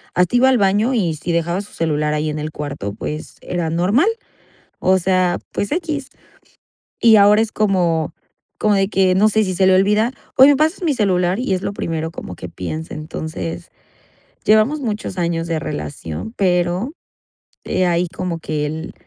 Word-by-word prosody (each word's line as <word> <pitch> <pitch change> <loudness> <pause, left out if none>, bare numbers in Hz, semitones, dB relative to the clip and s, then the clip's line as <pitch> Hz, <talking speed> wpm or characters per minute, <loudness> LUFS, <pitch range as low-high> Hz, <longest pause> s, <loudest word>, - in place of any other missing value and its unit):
hasta 180 +5 +2
iba 255 +2 +5
al 260 - +4
baño 205 +6 +2
y 180 -9 +1
si 170 +3 -4
dejaba 170 +3 0
su 205 - -12
celular 150 -2 0
ahí 150 +1 -1
en 150 - -3
el 155 +1 -4
cuarto, 140 -10 -5
pues 150 +7 -6
era 175 -2 -2
normal. 200 - +2 0.7
O 190 0 +3
sea, 185 -1 +1
pues 200 - -2
equis. 310 -5 -2 0.9
Y 225 -2 +7
ahora 205 +1 +6
es 225 -1 -1
como 175 -7 +1 0.5
como 210 -1 +3
de 195 0 +2
que 190 -2 +2
no 210 +3 +5
sé 215 +1 +2
si 185 -1 -2
se 190 +1 +3
le 190 - +5
olvida: 210 +5 +3 0.3
"Oye, 265 +2 +9
¿me 285 - +2
pasas 315 +5 +1
mi 310 -4 +2
celular?". 185 -3 +1
Y 225 -6 0
es 185 - -1
lo - - -2
primero 160 -4 -3
como 90 - -8
que 90 - -8
piense, 155 - -6
entonces, 160 +2 -6 0.8
llevamos 220 +8 +3
muchos 210 -6 -4
años 170 -1 -1
de 165 -1 0
relación, 75 - -5
pero, 180 - +1 0.7
eh, 185 - +1
ahí 175 0 +1
como 175 -1 -4
que 155 -2 -2
el, 160 +2 -6
185 Hz, 180 wpm, -19 LUFS, 160-215 Hz, 0.9 s, Oye